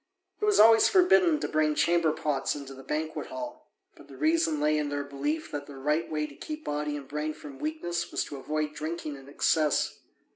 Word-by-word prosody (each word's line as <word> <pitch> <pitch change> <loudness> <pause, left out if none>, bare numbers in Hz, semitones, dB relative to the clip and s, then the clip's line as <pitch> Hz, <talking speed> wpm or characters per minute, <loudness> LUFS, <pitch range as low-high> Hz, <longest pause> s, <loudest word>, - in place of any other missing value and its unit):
It - - +2
was 420 -1 +3
always 225 +1 +8
forbidden 360 -4 +5
to - - -1
bring 155 -1 +1
chamber 165 +1 +3
pots 150 -3 -1
into 140 -2 -8
the 135 - -11
banquet 155 +3 -3
hall, 305 -1 -8 0.2
but - - -16
the - - -12
reason 310 - +2
lay 150 +1 +2
in 150 -1 -1
their 145 0 -2
belief 145 +3 -3
that 145 -1 -5
the 145 - -10
right 150 +5 0
way 150 -1 0
to 150 - -10
keep 305 - -7
body 150 0 -2
and 140 -2 -9
brain 150 +1 -3
from 140 -2 -11
weakness 175 - -3
was - - 0
to 145 - -7
avoid 150 +2 -2
drinking 155 -1 -4
in 135 0 -13
excess. 150 +1 +1
150 Hz, 210 wpm, -28 LUFS, 145-170 Hz, 0.2 s, always